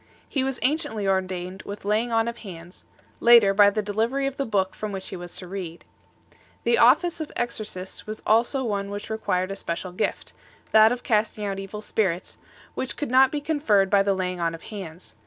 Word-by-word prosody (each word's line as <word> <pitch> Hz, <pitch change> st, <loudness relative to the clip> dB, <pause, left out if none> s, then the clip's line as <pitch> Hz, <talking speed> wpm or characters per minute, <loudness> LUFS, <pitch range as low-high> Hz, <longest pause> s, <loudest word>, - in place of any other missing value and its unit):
He 270 Hz, -, -1 dB
was 265 Hz, -1 st, -2 dB
anciently 275 Hz, -7 st, 0 dB
ordained 185 Hz, -1 st, -2 dB
with 200 Hz, 0 st, -8 dB
laying 220 Hz, +3 st, +1 dB
on 225 Hz, 0 st, +2 dB
of 235 Hz, 0 st, -4 dB
hands 175 Hz, -3 st, -11 dB
5; -, -, -29 dB, 0.2 s
later, 235 Hz, -4 st, +7 dB
by 205 Hz, 0 st, +7 dB
the 210 Hz, +1 st, -2 dB
delivery 225 Hz, +7 st, 0 dB
of 275 Hz, -1 st, -2 dB
the 275 Hz, -, -2 dB
book 195 Hz, -3 st, 0 dB
from 215 Hz, -1 st, -5 dB
which 190 Hz, -1 st, -5 dB
he -, -, -6 dB
was 175 Hz, -1 st, -8 dB
to 180 Hz, -, -7 dB
read 175 Hz, -3 st, -7 dB, 0.5 s
6. -, -, -28 dB, 0.2 s
The 470 Hz, -, +3 dB
office 345 Hz, -2 st, +4 dB
of 310 Hz, -, -5 dB
J^xorcist 215 Hz, -6 st, -5 dB
was 215 Hz, 0 st, -6 dB
also 235 Hz, +5 st, +3 dB
one 200 Hz, -4 st, -2 dB
which 205 Hz, +2 st, -6 dB
required 185 Hz, -4 st, -1 dB
a -, -, -3 dB
special 180 Hz, -1 st, -4 dB
gift 180 Hz, -, -3 dB, 0.4 s
that 220 Hz, 0 st, +7 dB
of 245 Hz, 0 st, -3 dB
casting 215 Hz, -1 st, 0 dB
out 195 Hz, -1 st, -3 dB
evil 200 Hz, +2 st, -7 dB
spirits 190 Hz, -5 st, -1 dB
7 -, -, -31 dB, 0.3 s
which 260 Hz, -, -4 dB
could 295 Hz, -5 st, -3 dB
not 260 Hz, +1 st, +6 dB
be 295 Hz, -, -2 dB
conferred 260 Hz, -11 st, +2 dB
by 200 Hz, -1 st, +5 dB
the 195 Hz, 0 st, +1 dB
laying 180 Hz, -1 st, -2 dB
on 165 Hz, -1 st, -1 dB
of 165 Hz, -, -13 dB
hands. 185 Hz, -5 st, -9 dB
205 Hz, 210 wpm, -25 LUFS, 190-235 Hz, 0.5 s, later